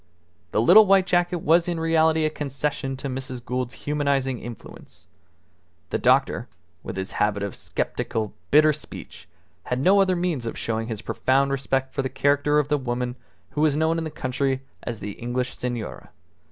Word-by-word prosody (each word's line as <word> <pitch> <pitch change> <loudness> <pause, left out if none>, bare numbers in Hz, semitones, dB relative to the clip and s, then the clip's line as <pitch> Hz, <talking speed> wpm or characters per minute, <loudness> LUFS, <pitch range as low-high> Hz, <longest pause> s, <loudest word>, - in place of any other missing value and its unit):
The 110 - +1
little 215 - +8
white 195 -1 +5
jacket 175 -1 +1
was 170 +3 +4
in 170 -2 -1
reality 160 -1 +3
a 155 - 0
concession 140 -2 -3
to 140 - -5
Mrs. 130 -2 -5
Gould's 125 0 -3
humanizing 140 -4 0
influence. 120 -2 -11 0.9
The - - 0
doctor, - - +2 0.3
with - - -7
his 95 0 -4
habit 105 -1 +1
of 100 - -3
sceptical, 110 -2 -3 0.2
bitter 155 +1 +6
speech, 150 - -10 0.4
had 125 - -1
no 195 +8 +5
other 185 -1 +2
means 170 -9 -1
of - - -5
showing 115 0 -2
his 110 -3 -5
profound 135 +1 +1
respect 135 -1 -1
for - - 0
the 130 - -2
character 145 +2 +2
of 150 -2 +2
the 150 -1 +1
woman 125 -1 -2 0.4
who 150 - -2
was 150 -2 +3
known 160 +1 +2
in - - -3
the 160 - -3
country 135 -1 -2 0.2
as 115 -3 -6
the 105 - -4
English 125 +4 -3
Senora. 120 -3 -5
135 Hz, 175 wpm, -24 LUFS, 125-155 Hz, 0.9 s, little